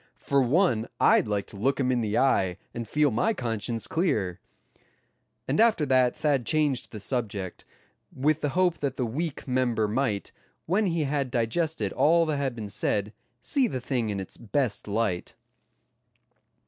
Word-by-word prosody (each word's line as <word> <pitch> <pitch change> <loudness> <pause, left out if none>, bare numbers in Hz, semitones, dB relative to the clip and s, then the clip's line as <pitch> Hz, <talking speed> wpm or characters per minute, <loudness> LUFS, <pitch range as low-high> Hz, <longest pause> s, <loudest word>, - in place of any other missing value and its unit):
For 140 -1 +1
one 125 - +2
I'd - - +4
like 105 -2 -1
to - - -8
look 130 +8 0
him 130 -1 +2
in 125 -1 +1
the 110 -1 -1
eye, 95 -9 +2 0.2
and 115 -1 -5
feel 150 +3 +2
my 215 - +1
conscience 115 - -2
clear," 120 - 0 1.1
and - - 0
after 220 -9 +4
that 130 -2 +3
Thad 145 -5 +1
changed 145 +1 0
the 110 - -7
subject, 105 -5 -3 0.5
with 150 +3 +1
the 145 - 0
hope 180 -2 +2
that 135 -3 -2
the 125 - 0
weak 145 +7 -4
member 125 -4 +1
might, 105 -2 -1 0.3
when 195 +5 +1
he 165 -3 0
had 140 -2 -1
digested 120 - -1
all 165 +2 +4
that 155 -2 -1
had 135 -3 -1
been 110 -3 -6
said, 105 +1 -1 0.3
see 260 - +1
the 130 - -3
thing 125 -3 -1
in 100 -1 -2
its 95 - -8
best 115 -3 -2
light. 100 -4 -1
125 Hz, 165 wpm, -27 LUFS, 110-150 Hz, 1.1 s, I'd